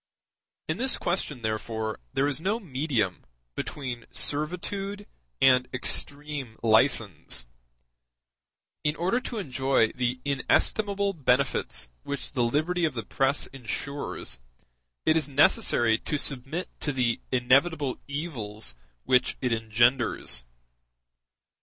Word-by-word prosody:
In - - -1
this 260 +2 +5
question, 150 -8 -2
therefore, 110 0 -2
there 135 - +2
is 145 +1 0
no 205 +6 0
medium 130 - -1 0.3
between 125 - -5
servitude 195 +7 0 0.3
and 125 -1 +5
extreme 140 -1 -2
license; 110 - +2 1.4
in 150 0 +1
order 185 +9 +1
to 250 -2 -6
enjoy 130 - +1
the 125 0 -1
inestimable 200 +8 +1
benefits 130 - +1
which 140 -1 -5
the 125 -4 +1
liberty 155 +9 +1
of 155 -5 +1
the 115 - -4
press 135 +1 0
ensures, 135 - -4 0.7
it 155 - +4
is 155 -3 +1
necessary 120 -5 +4
to 150 - -2
submit 140 +6 0
to 150 - -1
the 125 -4 0
inevitable 135 +3 +2
evils 120 - -3 0.3
which 125 -1 +2
it 125 -3 0
engenders. 110 - +2
135 Hz, 110 wpm, -27 LUFS, 120-155 Hz, 1.4 s, this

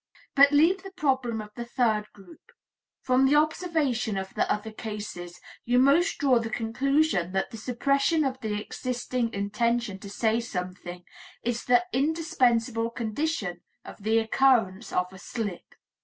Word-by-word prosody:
But 280 0 +7
leave 330 +6 +4
the 390 - -9
problem 260 - -1
of 210 0 -10
the 240 - -5
third 230 -3 0
group; 310 - -17 0.5
from 255 +1 +3
the 285 - +4
observation 300 - +1
of 190 0 -5
the - - 0
other 210 +1 -2
cases, 205 -6 -7 0.2
you 245 +1 +1
most 280 +8 +4
draw 260 -4 +3
the 225 -1 -4
conclusion 235 - 0
that 190 - -1
the 225 - -7
suppression 275 +7 +1
of 260 -1 -2
the 210 -3 -2
existing 245 +1 -3
intention 215 +1 -1
to 200 - -9
say 220 +2 +1
something 180 -4 -6 0.4
is 235 0 -2
the 245 +7 +4
indispensable 255 -7 +1
condition 225 - -3 0.2
of - - -11
the 220 +2 +2
occurrence 225 -3 +2
of 180 +1 -1
a 190 - -11
slip. 205 -6 -6
235 Hz, 150 wpm, -27 LUFS, 210-275 Hz, 0.5 s, But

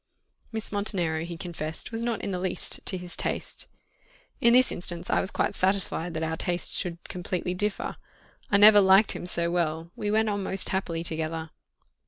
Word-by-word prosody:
Miss 220 -1 0
Montenero 180 -6 +1
he 170 -1 -7
confessed 160 0 -3
was 225 0 -3
not 235 -2 -2
in 200 - -2
the 180 - -2
least 185 0 0
to 190 - +2
his 180 -1 -5
taste. - - -3 0.7
In 235 - +5
this 255 0 +5
instance 175 0 -3
I - - +3
was 190 - -3
quite - - -1
satisfied 185 -3 +1
that 160 - -2
our 160 0 -2
tastes 175 +1 0
should 175 -3 -2
completely 180 0 -3
differ. 205 +2 -3 0.5
I 200 - +4
never 210 0 +8
liked 195 +2 +5
him 175 - -6
so 170 -1 0
well 165 -1 -1
we 205 - -3
went 220 +1 +2
on 205 -1 -1
most 190 0 0
happily 170 -3 -2
together. 160 -1 -3
180 Hz, 185 wpm, -27 LUFS, 170-205 Hz, 0.7 s, never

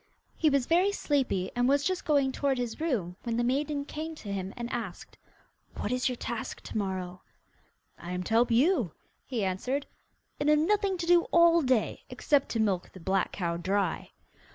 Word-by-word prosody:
He 315 - +3
was 275 -3 +2
very 360 +6 +3
sleepy, 265 - 0
and 245 +1 +2
was 285 +1 +3
just 370 +2 -1
going 280 -3 +3
toward 275 0 0
his 245 +3 -4
room, 205 - -1
when 235 -1 -2
the 240 - +1
maiden 280 +3 0
came 315 +2 -5
to 205 -9 -6
him 190 -1 -3
and 240 -1 -3
asked: 220 -7 -5 0.6
'What 210 - -3
is 250 +1 +1
your 250 - -2
task 235 -1 -5
to - - -9
morrow?' 185 -2 -4 0.8
'I 175 - -7
am 180 0 -2
to 220 - -4
help 235 +2 +4
you,' 245 - +3 0.3
he 230 -6 -1
answered, 250 +10 -2 0.5
'and 290 - +1
have 300 - +6
nothing 390 +4 +1
to 340 - -3
do 345 0 +5
all 340 0 +5
day, 255 -6 0
except 285 -3 +1
to 230 - -1
milk 195 -5 0
the 185 - -11
black 190 +2 0
cow 170 -3 -2
dry. 190 +1 -1
250 Hz, 190 wpm, -29 LUFS, 195-300 Hz, 0.8 s, have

